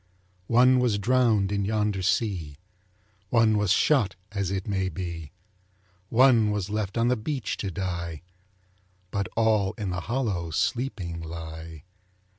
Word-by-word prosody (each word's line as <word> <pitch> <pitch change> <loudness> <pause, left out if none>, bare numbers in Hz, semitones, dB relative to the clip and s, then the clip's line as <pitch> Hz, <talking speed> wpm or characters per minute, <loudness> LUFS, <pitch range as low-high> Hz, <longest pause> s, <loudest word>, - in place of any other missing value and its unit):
One 125 +2 +5
was 120 -5 +2
drowned 110 -3 +2
in 100 -1 0
yonder 105 -1 0
sea, 90 -7 -1 0.7
One 110 -1 +4
was 105 -3 +1
shot 115 - +3 0.2
as 100 -3 -2
it 95 +1 -3
may 95 -2 0
be, 85 -3 -6 0.8
One 120 -3 +5
was 105 -1 -2
left 105 0 -2
on 115 +1 +2
the 125 - +3
beach 130 +3 -3
to 100 - -3
die, 85 -3 -4 0.9
But 100 -3 -1
all 110 -3 +2
in 100 -4 -4
the 90 0 -3
hollow 100 -6 -2
sleeping 90 - -2
lie. 80 -1 -8
100 Hz, 135 wpm, -26 LUFS, 90-115 Hz, 0.9 s, One